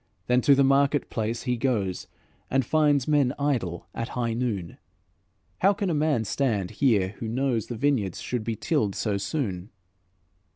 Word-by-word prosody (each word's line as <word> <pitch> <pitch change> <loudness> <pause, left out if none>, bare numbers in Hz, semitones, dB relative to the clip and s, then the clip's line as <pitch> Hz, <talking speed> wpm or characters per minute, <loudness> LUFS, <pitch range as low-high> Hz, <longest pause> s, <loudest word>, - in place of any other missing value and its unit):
Then 125 +1 +3
to 140 +3 +5
the 140 - +4
market 140 +1 +2
place 115 +1 -2
he 125 -2 -1
goes, 110 -8 -1 0.4
And 135 -1 +1
finds 145 -2 +2
men 145 -4 +2
idle 115 -13 -1
at 115 - -4
high 120 -2 0
noon: 110 -8 -3 0.8
'How 195 +2 +4
can 200 -3 -2
a - - 0
man 150 -7 +1
stand 105 -6 -1
here 105 -9 +2
who 115 - -4
knows 120 -1 -1
The 120 - -5
vineyards 115 -8 0
should 125 -3 -3
be 115 0 -2
tilled 110 - 0
so 105 -3 -1
soon?'" 100 - -3
125 Hz, 165 wpm, -26 LUFS, 110-140 Hz, 0.8 s, to